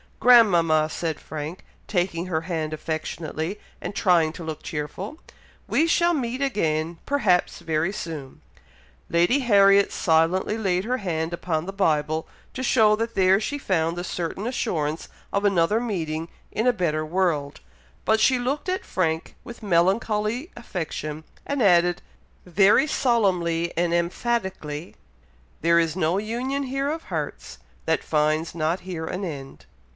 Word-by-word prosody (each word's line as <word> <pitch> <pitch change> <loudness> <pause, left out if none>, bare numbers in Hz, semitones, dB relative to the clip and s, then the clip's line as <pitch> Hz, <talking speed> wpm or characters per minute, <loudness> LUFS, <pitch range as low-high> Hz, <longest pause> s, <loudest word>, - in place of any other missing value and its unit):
"Grandmama!" 175 -11 +5
said 160 -1 -3
Frank, 155 +3 -7 0.2
taking 175 -3 -1
her 160 -3 -1
hand 160 -3 -3
affectionately, 160 +3 -4 0.2
and 200 - -6
trying 170 -7 +3
to 170 - -8
look 160 -1 -5
cheerful; 180 - -5 0.5
"we 320 - +2
shall 345 +1 +3
meet 255 -3 -2
again; 165 - 0
perhaps 210 -11 +2
very 165 +1 0
soon!" 155 -9 -7 0.7
Lady 175 +11 +3
Harriet 200 -5 +5
silently 165 +6 +2
laid 190 -2 0
her 250 +2 0
hand 165 -5 -2
upon 170 -2 -2
the 195 - -5
Bible, 155 -4 0 0.3
to 260 - -5
show 220 -4 +4
that 230 +1 -3
there 190 0 +4
she 285 +6 -3
found 165 - 0
the 175 - -4
certain 180 +3 -4
assurance 160 - -2 0.3
of 200 - +1
another 195 +2 +3
meeting 165 -9 -3 0.2
in 220 - -1
a 250 - +5
better 155 -6 -1
world; 155 -5 -1 0.5
but 220 0 +3
she 255 +3 +4
looked 275 +8 -2
at 370 +1 -2
Frank 160 -3 -1
with 235 -1 -10
melancholy 210 - +1
affection, 160 -8 -5 0.2
and 285 -2 -2
added, 175 -2 +4 0.4
very 195 - +4
solemnly 180 - +1
and 170 0 +1
emphatically, 175 -4 -2 0.7
"'There 170 +1 +4
is 165 -1 0
no 175 0 +1
union 245 +7 -2
here 275 +1 -2
of 320 +2 -4
hearts, - - -5 0.3
That - - +1
finds 155 +1 +1
not 165 +2 0
here 175 -3 -5
an 180 +4 -4
end.'" 140 -6 -7
180 Hz, 140 wpm, -24 LUFS, 160-220 Hz, 0.7 s, Grandmama